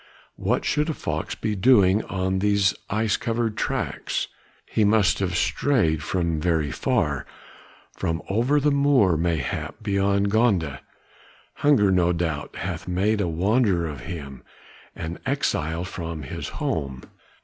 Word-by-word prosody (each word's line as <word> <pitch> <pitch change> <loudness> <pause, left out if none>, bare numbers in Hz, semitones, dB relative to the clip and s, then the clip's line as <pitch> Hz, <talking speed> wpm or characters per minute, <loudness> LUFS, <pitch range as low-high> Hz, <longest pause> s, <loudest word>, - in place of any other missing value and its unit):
What - - -1
should 150 +2 +1
a 155 - -1
fox 80 0 -3
be 110 -1 -2
doing 100 -2 +4
on 95 0 -1
these 100 -1 +3 0.2
ice 110 0 +1
covered 115 -3 -1
tracks? - - -2 0.4
he 110 - 0
must 105 -1 +3
have 90 -3 -1
strayed 85 - +1
from 85 -1 -1
very 80 -4 +1
far, 70 +1 0 0.7
from 80 0 -2
over 120 +9 +2
the 145 +1 +2
moor 140 - +4
mayhap 80 - -2
beyond 100 -1 +1
Gonda; 95 - +2 0.8
hunger 135 -9 +4
no 90 -1 +3
doubt 80 -3 -3
hath 85 -1 -5
made 100 +4 +1
a 95 - 0
wanderer 95 +2 +2
of 75 -4 -5
him, 70 -4 -7 0.5
an 80 +2 -5
exile 85 - -1
from 85 -4 -5
his 65 - -5
home. 70 -4 -3
95 Hz, 135 wpm, -24 LUFS, 80-110 Hz, 0.8 s, doing